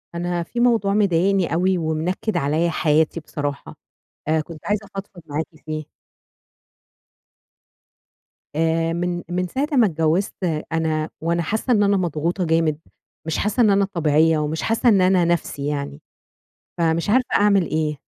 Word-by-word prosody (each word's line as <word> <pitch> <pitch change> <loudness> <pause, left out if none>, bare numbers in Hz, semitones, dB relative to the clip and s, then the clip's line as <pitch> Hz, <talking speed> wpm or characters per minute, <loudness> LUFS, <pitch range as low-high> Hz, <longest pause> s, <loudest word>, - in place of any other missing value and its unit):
أنا 175 0 -2
في 235 - -6
موضوع 230 -5 +3
مضايقني 195 -2 +2
أوي 185 +2 +2
ومنكّد 165 +6 -2
عليَّ 155 +5 +1
حياتي 155 +1 +1
بصراحة، 145 -3 -5 0.5
آآ، 155 0 +2
كنت 155 0 -10
عايزة 210 0 -1
أفضفض 195 -2 -8
معاكِ 150 +2 -2 0.2
فيه. 155 -1 -4 2.7
آآ 165 +1 +1
من، 175 0 -2
من 180 +1 -1
ساعة 270 +10 -2
أمّا 250 -5 +5
اتجوّزت 165 +3 0 0.4
أنا 160 -1 -1
وأنا 170 +1 0
حاسّة 220 +8 0
إن 205 -2 +3
أنا 200 0 +3
مضغوطة 175 +1 -1
جامد، 160 -2 +1 0.5
مش 160 - -2
حاسّة 210 +4 0
إن 220 - +5
أنا 200 0 +3
طبيعية، 160 -3 +2
ومش 155 +1 -2
حاسّة 225 +2 +2
إن 200 -4 +4
أنا 185 -1 +4
نَفْسي 165 -4 -1
يعني، 140 - -4 0.8
فمش 165 +2 +1
عارفة 250 +4 +3
أعمل 200 -3 +4
إيه؟ 155 -2 -2
170 Hz, 140 wpm, -22 LUFS, 155-195 Hz, 2.7 s, أمّا